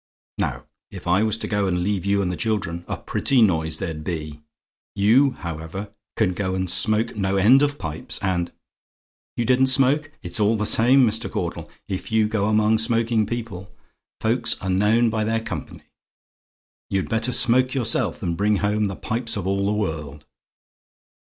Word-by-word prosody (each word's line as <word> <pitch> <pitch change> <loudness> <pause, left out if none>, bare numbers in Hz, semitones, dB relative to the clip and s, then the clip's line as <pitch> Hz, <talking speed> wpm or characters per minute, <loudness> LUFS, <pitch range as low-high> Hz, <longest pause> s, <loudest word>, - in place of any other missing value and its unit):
Now - - -2 0.3
if - - -10
I 90 +3 +3
was 110 0 +1
to - - -4
go 100 -2 0
and 90 -1 0
leave 100 0 -1
you 100 0 +2
and 90 - -1
the - - -3
children, 90 -5 -2
a - - -3
pretty 135 -2 +1
noise 80 -7 +2
there'd 80 -2 -5
be! 75 -3 -5 0.5
You, 120 +7 +4
however, 85 +4 -7 0.2
can 100 -5 +1
go 95 0 -2
and 95 0 -1
smoke 110 +5 +1
no 100 -1 0
end 120 +8 +6
of 145 0 +1
pipes 80 -1 -4
and 90 -2 -1 0.9
YOU 120 - 0
DIDN'T 130 +1 +3
SMOKE? 135 +3 +3
It's - - -3
all 105 +2 +3
the 105 -1 -1
same, 125 +5 +5
Mr. 110 0 -1
Caudle, - - -4 0.2
if 95 +3 -5
you 110 -1 +3
go 105 -2 0
among 110 +1 +3
smoking 115 -1 +1
people. 115 -6 -6 0.5
Folks 115 +1 0
are 95 - -3
known 110 +5 +3
by 110 -1 -1
their 115 +1 0
company. 115 - -7 1.1
You'd 95 -1 -1
better 115 +2 0
smoke 125 +2 +3
yourself, 115 -4 0
than 90 -4 -2
bring 105 +4 +1
home 105 +1 0
the 95 -1 -3
pipes 115 +2 -3
of 95 - -4
all 100 +1 0
the - - +1
world. 80 -8 -4
105 Hz, 175 wpm, -23 LUFS, 95-115 Hz, 1.1 s, end